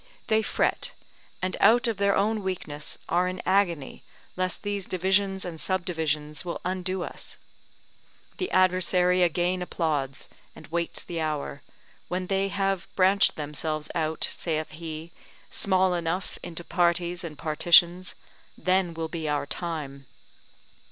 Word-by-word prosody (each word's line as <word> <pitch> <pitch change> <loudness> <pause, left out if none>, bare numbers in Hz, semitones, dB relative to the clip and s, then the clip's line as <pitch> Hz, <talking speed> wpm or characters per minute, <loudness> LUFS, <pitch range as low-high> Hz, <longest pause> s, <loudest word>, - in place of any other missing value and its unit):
They 220 0 +4
fret, 220 - 0 0.5
and 185 - 0
out 240 +2 +6
of 225 -3 -1
their 200 0 +3
own 215 +2 +1
weakness 165 -6 -4
are 175 +2 +2
in 185 0 -4
agony, 180 -7 +1 0.3
lest 185 0 -2
these 205 -2 -2
divisions 190 +1 +1
and 165 -4 -5
subdivisions 160 -4 -1
will 175 -1 -4
undo 185 0 -1
us. - - -5 1.0
The 370 - -2
adversary 185 0 +3
again 175 +1 +2
applauds, 150 -6 -2 0.3
and - - -11
waits 170 +1 -2
the 170 -2 -4
hour: 150 -3 -2 0.5
when 185 +1 -2
they 195 +1 +1
have 195 -2 -1
branched 195 +1 +5
themselves 150 +1 -3
out, 160 -1 0
saith 155 -2 -2
he, 160 +1 -7 0.4
small 190 -1 +3
enough 175 +2 -2
into 175 -1 -7
parties 175 +1 +1
and 155 -3 -7
partitions, 175 +3 +4 0.4
then 185 -2 +1
will 165 0 -2
be 160 -2 -3
our 145 -1 0
time. 145 -5 -3
175 Hz, 130 wpm, -27 LUFS, 160-185 Hz, 1.0 s, out